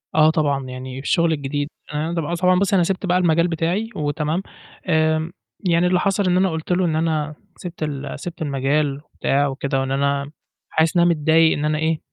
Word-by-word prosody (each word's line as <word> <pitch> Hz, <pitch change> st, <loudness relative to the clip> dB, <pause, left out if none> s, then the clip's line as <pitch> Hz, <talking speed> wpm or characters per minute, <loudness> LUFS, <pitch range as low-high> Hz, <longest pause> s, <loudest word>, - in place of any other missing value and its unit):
آه، 155 Hz, 0 st, +6 dB
طبعًا، 145 Hz, -4 st, 0 dB
يعني 130 Hz, 0 st, -7 dB
الشُغل 165 Hz, +4 st, +2 dB
الجديد 145 Hz, 0 st, -3 dB, 0.2 s
أنا 155 Hz, +3 st, -2 dB
طبعًا 170 Hz, 0 st, -2 dB
ص 170 Hz, -, -8 dB
طبعًا 180 Hz, 0 st, +4 dB
بُصّي 200 Hz, 0 st, +2 dB
أنا 180 Hz, -, +4 dB
سِبت 190 Hz, +2 st, -1 dB
بقى 180 Hz, -1 st, +2 dB
المجال 170 Hz, -1 st, +3 dB
بتاعي 175 Hz, +6 st, -1 dB
وتمام، 150 Hz, +4 st, -1 dB, 0.5 s
آمم، 160 Hz, 0 st, +2 dB, 0.3 s
يعني 175 Hz, -2 st, +2 dB
اللي 180 Hz, 0 st, +2 dB
حصل 200 Hz, +1 st, +1 dB
إن 180 Hz, 0 st, +3 dB
أنا 190 Hz, +1 st, +3 dB
قُلت 160 Hz, +1 st, -4 dB
له 180 Hz, +1 st, +2 dB
إن 160 Hz, -2 st, 0 dB
أنا 155 Hz, -2 st, -1 dB, 0.2 s
سِبت 175 Hz, -3 st, -7 dB
ال 145 Hz, -2 st, -4 dB
سِبت 175 Hz, 0 st, -7 dB
المجال 140 Hz, 0 st, 0 dB
وبتاع 140 Hz, +1 st, +1 dB
وكده 135 Hz, 0 st, -2 dB
وإن 135 Hz, 0 st, -2 dB
أنا 140 Hz, +1 st, 0 dB, 0.4 s
حاسس 160 Hz, +1 st, +1 dB
إنّها 175 Hz, 0 st, +5 dB
متضايق 160 Hz, 0 st, +3 dB
إن 145 Hz, -, -2 dB
أنا 155 Hz, 0 st, +1 dB
إيه، 160 Hz, 0 st, 0 dB
160 Hz, 200 wpm, -21 LUFS, 145-175 Hz, 0.5 s, آه